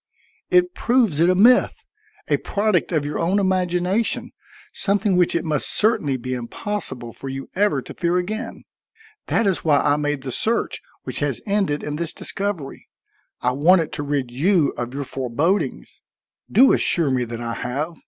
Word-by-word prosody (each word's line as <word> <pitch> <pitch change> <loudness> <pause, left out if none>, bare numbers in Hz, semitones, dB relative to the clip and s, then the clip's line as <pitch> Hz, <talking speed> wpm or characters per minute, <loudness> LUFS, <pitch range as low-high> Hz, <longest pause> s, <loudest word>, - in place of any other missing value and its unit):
It 360 -1 +3
proves 235 - +2
it 170 +2 +4
a 185 - +3
myth, 240 +7 +4 0.4
a - - +2
product 205 -4 0
of 155 -4 0
your 145 - -3
own 175 +4 +1
imagination, 185 +2 0 0.4
something 200 -1 +1
which 180 -1 +2
it 170 - -1
must 150 -3 -1
certainly 160 - +2
be 130 +1 -5
impossible 125 - -5
for 135 - -8
you 135 0 -7
ever 205 +2 +1
to - - -9
fear 175 0 0
again. 215 +6 -4 0.6
That 225 - +1
is 195 -3 0
why 150 -3 +4
I 145 0 +2
made 145 -2 -2
the 130 - -4
search 230 - -1 0.2
which - - -5
has - - -1
ended 195 -8 0
in 150 0 -4
this 170 0 -3
discovery. 195 -8 -4 0.5
I 125 - +1
wanted 160 +5 +3
to 145 - -2
rid 140 -4 -2
you 160 +4 +2
of 120 0 -4
your 140 - -2
forebodings. 135 - -2 0.5
Do 260 +6 +6
assure 165 -6 +2
me 125 -1 +1
that 115 0 -6
I 115 -1 -4
have. 150 +9 -4
170 Hz, 170 wpm, -22 LUFS, 140-200 Hz, 0.6 s, Do